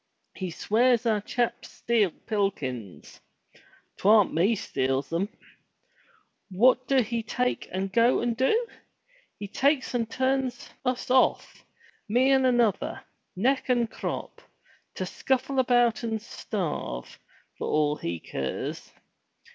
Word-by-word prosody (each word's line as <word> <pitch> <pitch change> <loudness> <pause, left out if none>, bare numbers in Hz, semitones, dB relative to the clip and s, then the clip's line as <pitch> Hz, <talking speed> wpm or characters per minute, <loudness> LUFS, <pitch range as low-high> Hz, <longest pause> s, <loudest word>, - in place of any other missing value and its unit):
He 185 -2 -5
swears 235 +7 +2
our 215 -3 +2
chaps 240 +3 -2
steal 225 -5 +1
pilkins. 150 - -4 0.8
'Twam't 210 0 +5
me 195 +8 +3
steals 135 -5 -2
'em. 190 +5 0 1.2
What 250 +6 +3
do 270 -2 +3
he 230 +1 -2
take 250 +3 -2
and 190 +1 -3
go 235 +3 +4
and 235 -1 -1
do? 440 - +2 0.7
He 205 - -6
takes 275 +5 +1
and 230 -2 -1
turns 260 +1 -1
us 250 0 -2
off, 260 0 +2 0.5
me 250 +5 +3
and 265 -1 +4
another, 240 -5 +1 0.3
neck 260 +8 +1
and 240 -2 +2
crop, - - -5 0.5
to - - -3
scuffle 265 +1 -1
about 245 -2 +3
and 225 -2 -2
starve, 170 - -5 0.4
for - - -3
all 150 -1 +2
he 85 0 -4
keers. 65 -3 -5
230 Hz, 120 wpm, -27 LUFS, 190-255 Hz, 1.2 s, Twam't